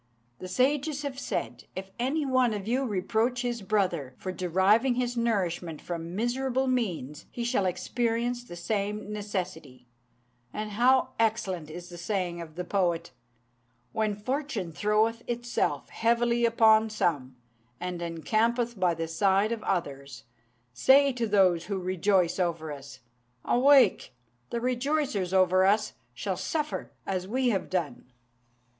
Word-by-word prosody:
The 185 - -6
sages 280 +7 +1
have 275 -2 -4
said, - - -4
'If 190 +1 -6
any 280 +5 0
one 255 -4 +2
of 205 0 -6
you 260 +4 +1
reproach 230 +4 0
his 240 -2 -2
brother 180 -10 -1
for 185 - -4
deriving 190 +8 +2
his 245 0 -1
nourishment 185 -8 -1
from 170 0 -6
miserable 255 +4 0
means, 180 - -2
he 240 - -5
shall 235 -5 +1
experience 235 +6 -1
the 200 -8 -10
same 210 +3 -3
necessity,' 180 -11 -5 0.7
and 215 0 -4
how 250 +5 +3
excellent 195 -8 0
is 175 +2 -8
the 175 -1 -9
saying 175 -2 -2
of 160 -2 -10
the 180 - -3
poet 175 -4 0 0.8
"'When 215 -2 0
fortune 240 - -3
throweth 215 +7 +1
itself 240 0 -1
heavily 235 +1 +2
upon 220 -1 +5
some, 145 -11 -1 0.4
and 180 -1 -4
encampeth 220 +7 0
by 180 -2 +2
the 165 0 -3
side 195 +5 +2
of 230 -2 -2
others, 140 -8 -3 0.5
Say 270 - +5
to 240 -2 -1
those 185 -5 +3
who 200 -2 -2
rejoice 185 0 +1
over 165 -3 -1
us, 140 -2 -10 0.4
"Awake: 255 - +4 0.3
the 235 - -2
rejoicers 255 - 0
over 185 0 +4
us 210 +2 +2 0.2
shall - - -3
suffer 305 -1 -3
as 185 -1 -2
we 255 +4 +1
have 195 -5 -1
done."' 170 -9 -2
210 Hz, 140 wpm, -28 LUFS, 175-240 Hz, 0.8 s, upon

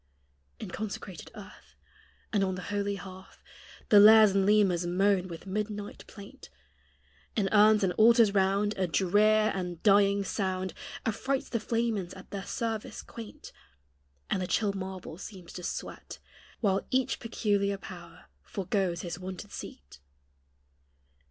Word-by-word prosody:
In 180 - -8
consecrated 200 -3 -6
earth, - - -13 0.6
And 200 -2 +2
on 190 -1 -1
the 180 - -7
holy 200 0 -1
hearth, 190 0 -12 0.5
The 205 - +8
lares 215 0 +8
and 195 0 +2
lemures 200 -5 +3
moan 185 +1 +2
with 170 0 -9
midnight 205 +1 -4
plaint; 200 - -12 0.9
In 205 -3 +1
urns 215 0 +5
and 180 -2 +1
altars 230 -2 +6
round 200 +2 +2
A 185 - +1
drear 210 +6 +3
and 180 -3 -5
dying 200 -1 +4
sound 185 -2 -2 0.3
Affrights 265 +5 -1
the 230 - -1
flamens 220 -5 -2
at - - -13
their 195 -1 -5
service 225 -2 -4
quaint; 225 -2 -10 0.8
And 190 - +1
the 180 - -2
chill 205 0 +1
marble 190 -3 -7
seems 185 -4 -10
to 180 - -7
sweat, - - -6 0.4
While 195 -3 +1
each 260 0 0
peculiar 205 -3 0
power 175 -3 -11 0.2
forgoes 185 - -2
his 175 0 -6
wonted 190 +2 -7
seat. 65 0 -10
200 Hz, 135 wpm, -29 LUFS, 185-215 Hz, 0.9 s, The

